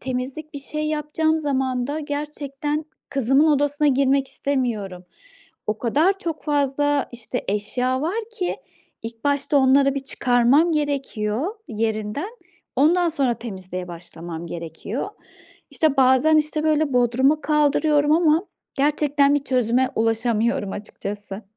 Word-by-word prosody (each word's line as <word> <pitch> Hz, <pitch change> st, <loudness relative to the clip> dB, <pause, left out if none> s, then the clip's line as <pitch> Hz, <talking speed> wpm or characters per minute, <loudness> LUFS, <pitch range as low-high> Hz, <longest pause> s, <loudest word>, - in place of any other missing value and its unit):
temizlik, 265 Hz, +5 st, -5 dB
bir 285 Hz, -, -5 dB
şey 305 Hz, +1 st, -3 dB
yapacağım 310 Hz, +1 st, 0 dB
zaman 260 Hz, -4 st, -1 dB
da 300 Hz, +2 st, -2 dB
gerçekten 290 Hz, 0 st, -4 dB, 0.3 s
kızımın 275 Hz, +3 st, +3 dB
odasına 290 Hz, 0 st, +2 dB
girmek 275 Hz, 0 st, +2 dB
istemiyorum. 220 Hz, -10 st, -2 dB, 0.6 s
O 215 Hz, 0 st, -1 dB
kadar 310 Hz, -, +2 dB
çok 330 Hz, -5 st, -4 dB
fazla, 290 Hz, -1 st, +1 dB
işte, 240 Hz, +1 st, -5 dB
eşya 250 Hz, +6 st, -1 dB
var 350 Hz, +8 st, -1 dB, 0.2 s
ki 360 Hz, -2 st, -1 dB, 0.5 s
ilk 225 Hz, 0 st, -8 dB
başta 285 Hz, 0 st, +1 dB
onları 275 Hz, +1 st, +4 dB
bir -, -, 0 dB
çıkarmam 265 Hz, +4 st, +3 dB
gerekiyor 280 Hz, -, -1 dB
yerinden, 220 Hz, -, -2 dB, 0.5 s
ondan 340 Hz, +6 st, +4 dB
sonra 275 Hz, -6 st, +1 dB
temizliğe 185 Hz, -5 st, -7 dB
başlamam 170 Hz, -1 st, -8 dB
gerekiyor. 170 Hz, -, -5 dB, 0.6 s
İşte, 310 Hz, -3 st, +1 dB
bazen, 260 Hz, +4 st, +5 dB
işte, 305 Hz, 0 st, 0 dB
böyle, 310 Hz, -2 st, +2 dB
bodruma 250 Hz, +5 st, +3 dB
kaldırıyorum 300 Hz, 0 st, +2 dB
ama 325 Hz, +2 st, +3 dB, 0.3 s
gerçekten 285 Hz, 0 st, +2 dB
bir 290 Hz, -1 st, 0 dB
çözüme 250 Hz, 0 st, +1 dB
ulaşamıyorum 225 Hz, -1 st, 0 dB
açıkçası. 205 Hz, 0 st, -7 dB
275 Hz, 120 wpm, -22 LUFS, 235-300 Hz, 0.6 s, bazen